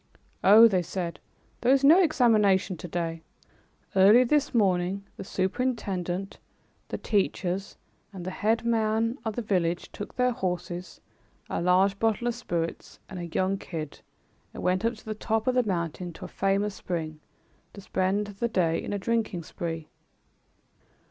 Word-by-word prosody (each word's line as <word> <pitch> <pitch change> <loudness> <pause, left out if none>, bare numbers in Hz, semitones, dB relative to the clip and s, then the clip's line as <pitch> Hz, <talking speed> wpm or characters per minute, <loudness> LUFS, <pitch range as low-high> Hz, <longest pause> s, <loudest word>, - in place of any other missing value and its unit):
"Oh," 220 +4 +9
they 190 -5 +1
said, 175 0 -4 0.4
"there 245 - +3
is 275 0 +4
no 320 +7 +7
examination 215 - +3
to 175 - -7
day. 165 -1 -3 0.7
Early 205 +6 +7
this 285 +3 +1
morning, 195 -3 +1
the - - -7
superintendent, 190 -3 -2 0.5
the - - -4
teachers 195 -2 -1 0.3
and 185 -3 -8
the 185 - -3
headman 225 +3 +1
of 220 -2 -3
the 240 - -3
village 175 -5 -1
took 205 - -8
their 250 0 +2
horses, 180 -3 -4 0.5
a - - -1
large 190 +3 +3
bottle 225 +1 +1
of 240 - +1
spirits 170 -8 -4
and 185 - -6
a 175 - -5
young 190 +3 0
kid, 155 -4 -6 0.6
and - - -6
went 185 +3 +1
up 235 +1 +1
to 220 - -17
the 215 - -3
top 220 +1 -1
of 255 - +2
the 250 - +4
mountain 175 -4 -3
to - - -9
a - - -6
famous 195 +1 0
spring 160 -5 -4 0.5
to 200 - -10
spend 190 +2 0
the 205 +3 -3
day 170 -6 +1
in - - -5
a - - 0
drinking 215 -3 -1
spree." 165 -1 -5
195 Hz, 155 wpm, -27 LUFS, 180-225 Hz, 0.7 s, Oh